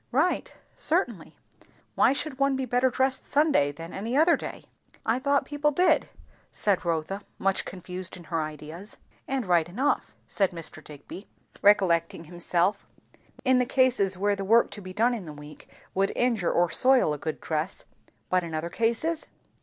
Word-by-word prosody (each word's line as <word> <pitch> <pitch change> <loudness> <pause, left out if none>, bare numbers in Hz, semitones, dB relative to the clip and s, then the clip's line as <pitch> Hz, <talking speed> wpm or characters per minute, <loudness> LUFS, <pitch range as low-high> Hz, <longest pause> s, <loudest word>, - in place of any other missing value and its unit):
"Eight? 325 +6 +1 0.2
certainly. - - 0 0.6
Why - - +4
should 275 0 -3
one 275 0 +2
be 265 0 -2
better 250 +1 +2
dressed 265 +1 0
Sunday 290 - +2
than 165 +4 -9
any 225 +7 -2
other 325 +2 +5
day?" - - -7 0.4
"I 230 +3 +1
thought 280 0 +1
people 290 +1 0
did 355 +5 +2 0.2
" - - -31
said 200 -3 +1
Rotha, 170 +3 -2 0.2
much 195 0 0
confused 185 0 -7
in 175 - -12
her 165 -1 -2
ideas. 155 +6 -8 0.3
"And 265 -3 -1
right 175 -2 +2
enough," 265 +11 -1
said 195 -3 0
Mr. 165 -2 -4
Digby, 150 +7 -11 0.3
recollecting 170 -5 +3
himself, 175 +3 -1 0.6
"in 260 -1 +4
the 250 - +2
cases 240 -9 +2
where 205 +2 +1
the 195 - -4
work 230 +4 +4
to 205 - -7
be 185 -1 -8
done 230 +6 +2
in 220 -6 -5
the 150 - -7
week 150 +1 -13 0.2
would 195 +1 +1
injure 235 -8 +1
or 175 +1 +3
soil 255 - +4
a 150 - -5
good 155 +1 -4
dress. 160 +3 -3 0.4
But 185 -1 +1
in 165 -2 -5
other 165 +2 -3
cases? 235 - 0
195 Hz, 170 wpm, -27 LUFS, 170-260 Hz, 0.6 s, other